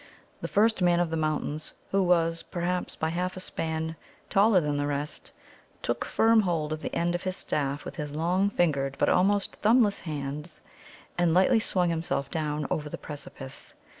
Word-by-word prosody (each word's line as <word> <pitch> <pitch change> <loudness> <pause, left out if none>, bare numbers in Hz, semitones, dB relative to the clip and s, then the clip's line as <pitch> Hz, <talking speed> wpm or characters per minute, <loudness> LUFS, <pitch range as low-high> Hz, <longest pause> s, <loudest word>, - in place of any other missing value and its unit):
The - - -2
first 220 0 +3
Man 175 -1 +4
of 175 -2 0
the - - 0
Mountains, 155 -1 -2 0.2
who 195 - +3
was, 165 -2 +2
perhaps 180 +1 -2
by 160 - -1
half 180 +3 -2
a - - -4
span, 160 -2 -3 0.4
taller 200 0 +5
than 150 -3 -1
the 145 0 0
rest, 145 +1 -4 0.5
took - - -1
firm 225 0 +4
hold 165 -5 -1
of 155 - -4
the - - -3
end 175 +1 +1
of 175 - -2
his 185 0 -3
staff 145 0 -2
with - - -7
his 150 -2 -4
long 175 +6 +1
fingered 140 -8 +1
but - - +2
almost 200 +2 +2
thumbless 215 -2 +4
hands, 150 +1 -5 0.6
and 175 -2 +3
lightly 205 +6 +5
swung 180 -5 +1
himself 160 -4 -2
down 150 -2 -1
over 150 -1 -1
the - - -5
precipice. 140 -2 -8
165 Hz, 180 wpm, -28 LUFS, 150-185 Hz, 0.6 s, taller